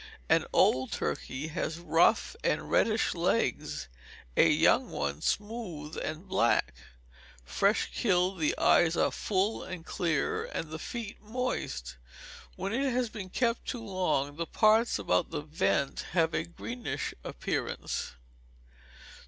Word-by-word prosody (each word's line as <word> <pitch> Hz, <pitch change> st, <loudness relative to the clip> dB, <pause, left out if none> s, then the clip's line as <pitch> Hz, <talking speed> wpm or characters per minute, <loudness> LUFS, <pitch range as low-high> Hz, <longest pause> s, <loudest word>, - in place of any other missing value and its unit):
An -, -, +3 dB
old 130 Hz, 0 st, +3 dB
turkey 140 Hz, +4 st, -3 dB
has 160 Hz, 0 st, -3 dB
rough 170 Hz, -1 st, +3 dB
and -, -, 0 dB
reddish -, -, +3 dB
legs; -, -, 0 dB, 0.5 s
a -, -, +6 dB
young -, -, +4 dB
one 70 Hz, 0 st, -3 dB
smooth 200 Hz, -9 st, -3 dB
and 155 Hz, +5 st, -5 dB
black. 190 Hz, -10 st, +2 dB, 0.7 s
Fresh 200 Hz, -, +1 dB
killed, 185 Hz, -3 st, +1 dB
the 155 Hz, -, +1 dB
eyes 170 Hz, 0 st, +4 dB
are -, -, +3 dB
full 200 Hz, +2 st, 0 dB
and 180 Hz, -3 st, -7 dB
clear, 435 Hz, -, 0 dB
and 165 Hz, -, -5 dB
the 160 Hz, -, -5 dB
feet 225 Hz, +2 st, -6 dB
moist. 210 Hz, -, -3 dB, 0.6 s
When 195 Hz, +3 st, -3 dB
it 270 Hz, +2 st, +1 dB
has 245 Hz, -1 st, 0 dB
been 205 Hz, -4 st, -7 dB
kept 230 Hz, +4 st, 0 dB
too 235 Hz, -3 st, -4 dB
long, 155 Hz, -8 st, 0 dB
the 170 Hz, 0 st, -2 dB
parts 220 Hz, +2 st, +4 dB
about 90 Hz, -3 st, +1 dB
the -, -, -3 dB
vent 150 Hz, -2 st, 0 dB
have 165 Hz, -2 st, +2 dB
a 165 Hz, -, 0 dB
greenish 230 Hz, +8 st, -5 dB
appearance. -, -, -3 dB
180 Hz, 130 wpm, -30 LUFS, 155-220 Hz, 0.7 s, a